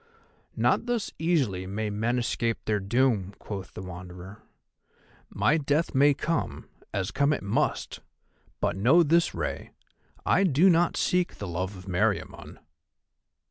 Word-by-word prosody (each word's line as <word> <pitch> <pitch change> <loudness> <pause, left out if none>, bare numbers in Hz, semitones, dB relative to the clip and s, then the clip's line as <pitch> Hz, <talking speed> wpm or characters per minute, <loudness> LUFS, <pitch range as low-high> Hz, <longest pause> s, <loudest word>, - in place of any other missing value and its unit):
"Not 235 - +1
thus 240 -3 -1
easily 135 - 0
may 105 +2 -3
men 115 +4 0
escape 115 -1 -1
their 105 -1 +1
doom," 100 -2 +1
quoth 95 -3 -7
the - - -6
Wanderer. 90 +3 -9 0.9
"My 155 +2 +2
death 150 +3 0
may 140 +1 +5
come, 165 +3 -2 0.2
as 95 -1 -2
come 140 +2 +2
it - - -4
must; 100 - -1 0.6
but - - 0
know 130 - +5
this, 165 +2 +2
Rei, - - -4 0.6
I 195 - +3
do 180 +2 +5
not 170 0 +2
seek 180 -1 +1
the 100 - -6
love 90 +3 -3
of 90 - -12
Meriamun." 90 -1 -2
115 Hz, 140 wpm, -27 LUFS, 95-160 Hz, 0.9 s, may